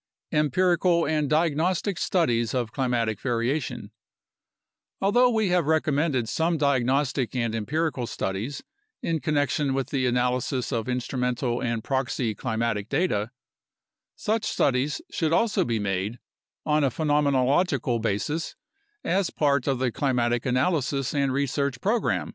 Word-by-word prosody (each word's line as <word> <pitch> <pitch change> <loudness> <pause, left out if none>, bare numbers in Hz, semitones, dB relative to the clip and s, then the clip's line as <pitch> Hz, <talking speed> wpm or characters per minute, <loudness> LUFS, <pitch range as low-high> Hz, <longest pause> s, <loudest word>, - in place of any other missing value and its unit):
Empirical 170 +3 +2
and 150 -2 0
Diagnostic 165 +4 +1
Studies 120 - +1
of 120 -4 -1
Climatic 115 -5 -1
Variation 120 -2 -2 1.1
Although 240 +6 +4
we 220 -4 +1
have 175 -4 +2
recommended 150 -5 +1
some 165 +6 0
diagnostic 135 -2 +1
and 115 -3 0
empirical 135 +3 -1
studies 105 +10 -4 0.4
in 165 -1 0
connection 145 -2 0
with 135 -1 -2
the 130 -3 +1
analysis 125 +1 0
of 115 -1 -2
instrumental 125 -1 -1
and 115 -2 -2
proxy 130 -4 -1
climatic 110 -2 -2
data, 135 - 0 0.9
such 220 +1 -1
studies 135 -2 0
should 160 -1 0
also 225 +3 +2
be 115 -2 -1
made 100 +2 -2 0.5
on 150 0 +2
a 135 - +3
phenomenological 140 -2 +1
basis 115 +10 -2 0.5
as 195 0 +1
part 140 -3 +1
of 135 -2 +1
the 125 -1 0
climatic 120 -2 0
analysis 135 0 0
and 140 -2 +1
research 140 -1 -1
program. 220 - 0
135 Hz, 125 wpm, -25 LUFS, 120-155 Hz, 1.1 s, Although